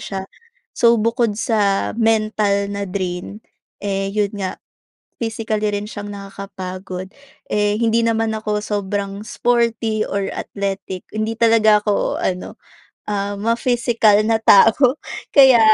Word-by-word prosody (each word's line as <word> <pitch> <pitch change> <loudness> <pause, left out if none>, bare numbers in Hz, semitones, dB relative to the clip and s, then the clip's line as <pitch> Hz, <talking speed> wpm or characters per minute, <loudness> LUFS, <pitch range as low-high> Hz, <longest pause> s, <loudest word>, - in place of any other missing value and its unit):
siya. 195 -1 -5 0.5
So, 235 0 +4
bukod 230 0 +1
sa 205 -4 +1
mental 215 -3 +1
na 200 0 -3
drain, 185 +2 -4 0.4
eh, 195 -1 -1
yun 205 -2 +1
nga 190 -2 -3 0.6
physically 220 -2 -2
rin 205 +1 -3
siyang 205 -1 -7
nakakapagod. 190 -2 -7 0.4
Eh, 210 0 +1
hindi 230 0 +2
naman 225 0 +1
ako 210 -1 -2
sobrang 200 0 -3
sporty 230 -3 0
or 200 -1 -2
athletic. 195 -2 -5
Hindi 215 +1 -2
talaga 225 -2 +4
ako 210 -1 0
ano, 180 0 -3 0.5
ah, 205 -1 -2
ma-physical 230 -1 +2
na 225 0 +2
tao. 240 +6 +6 0.3
Kaya 265 -5 +7
210 Hz, 120 wpm, -19 LUFS, 200-225 Hz, 0.6 s, Kaya